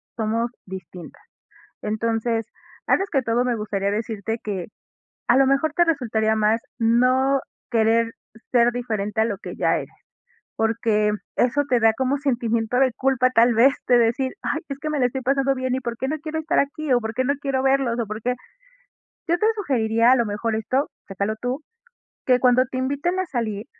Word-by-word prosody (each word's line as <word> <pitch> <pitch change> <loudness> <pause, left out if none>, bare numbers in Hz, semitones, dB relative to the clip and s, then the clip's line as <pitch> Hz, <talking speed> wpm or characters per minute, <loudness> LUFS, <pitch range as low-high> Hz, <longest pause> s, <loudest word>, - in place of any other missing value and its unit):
somos 230 +1 -1
distintas. 185 -2 -10 0.6
Entonces, 225 +1 -1 0.4
antes 390 - +2
que 275 -4 +2
todo, 240 +1 0
me 245 -1 +1
gustaría 200 -2 -2
decirte 220 +1 -3
que 195 -5 -4 0.6
a 240 - +5
lo 270 - +5
mejor 275 +3 +1
te 345 - +3
resultaría 225 -8 +1
más 215 +1 +2 0.2
no 255 +4 +3 0.3
querer 230 0 +2 0.4
ser 240 -1 +4
diferente 220 -3 -2
a - - +3
lo 210 -3 -2
que - - -8
ya - - +2
eres, - - -6 0.7
porque 225 -1 +1 0.3
eso 270 +4 +2
te 250 - +3
da 225 0 +5
como 260 +3 0
sentimiento 235 -4 0
de 265 -1 +3
culpa 260 -1 +2
tal 235 -1 +4
vez, 260 +5 +5
de 245 -1 +6
decir: 240 +3 +1
"Ay, 315 - -1
es 275 -1 -5
que 305 - -4
me 305 -1 -1
lo 250 - +3
estoy 265 +2 -4
pasando 275 +1 +1
bien, 260 -1 -2
¿y 260 - -1
por 235 -2 -4
qué 265 - -2
no 310 - -1
quiero 315 0 -3
estar 315 +2 0
aquí? 285 +1 0
¿O 245 - +4
por 220 -1 -4
qué 255 - 0
no 280 +2 +1
quiero 275 -2 -1
verlos? 265 -3 +2
¿O 230 - -2
por 215 +1 -6
qué?". 250 +2 0 0.9
Yo 345 +1 +2
te 425 - 0
sugeriría, 235 - +2
a - - +7
lo 235 -2 +1
mejor 215 +2 -2
esto, 255 +6 0 0.2
chécalo 200 +2 -2
tú, 250 +4 -2 0.7
que 250 -1 +4
cuando 250 0 +5
te 255 - -3
inviten 285 +8 -1
a 375 - 0
salir, 225 -7 -3
240 Hz, 190 wpm, -23 LUFS, 225-270 Hz, 0.9 s, a